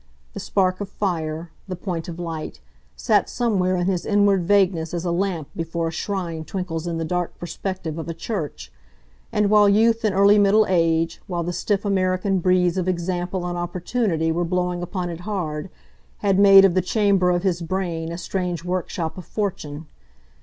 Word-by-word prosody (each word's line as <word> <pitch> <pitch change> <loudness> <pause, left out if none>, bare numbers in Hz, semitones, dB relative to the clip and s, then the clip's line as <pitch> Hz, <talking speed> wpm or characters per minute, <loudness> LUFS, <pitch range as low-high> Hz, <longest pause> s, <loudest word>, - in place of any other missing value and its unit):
The - - -6
spark 185 -1 0
of 200 - -4
fire, 165 -5 -3 0.2
the 185 - -4
point 175 -2 -4
of 170 -1 -6
light, 165 -3 -5 0.4
sat - - +2
somewhere 195 -7 +1
in 175 -1 0
his 185 -2 0
inward 200 -3 +3
vagueness 180 -4 +2
as 170 +1 -3
a 175 - 0
lamp 175 -4 -1
before 165 0 -2
a - - -6
shrine 170 -2 -3
twinkles 175 -1 -4
in 170 -1 -2
the 165 - -2
dark 180 +1 -2
perspective 175 -1 -5
of 165 - -5
a - - -2
church; 150 - -5 0.6
and 210 -1 +1
while 210 -1 +6
youth 225 +3 +3
and 210 -3 +1
early 200 +2 +6
middle 205 +2 +5
age, 165 -2 +1
while 175 -2 -2
the 175 +1 -3
stiff 205 +2 -1
American 190 0 +1
breeze 180 0 +2
of 185 - -2
example 180 0 -2
and 175 0 -3
opportunity 175 -1 -1
were 170 +2 0
blowing 180 0 -1
upon 175 0 -3
it 165 - -7
hard, 175 -4 -4 0.6
had 195 -1 +3
made 195 -1 +9
of 190 - +3
the 185 - +3
chamber 195 -1 +2
of 175 0 +1
his 180 -3 0
brain 170 -2 -3
a 170 - -5
strange 180 -2 -3
workshop 180 -1 -3
of 180 - -10
fortune. 160 -7 -4
180 Hz, 180 wpm, -23 LUFS, 170-195 Hz, 0.6 s, made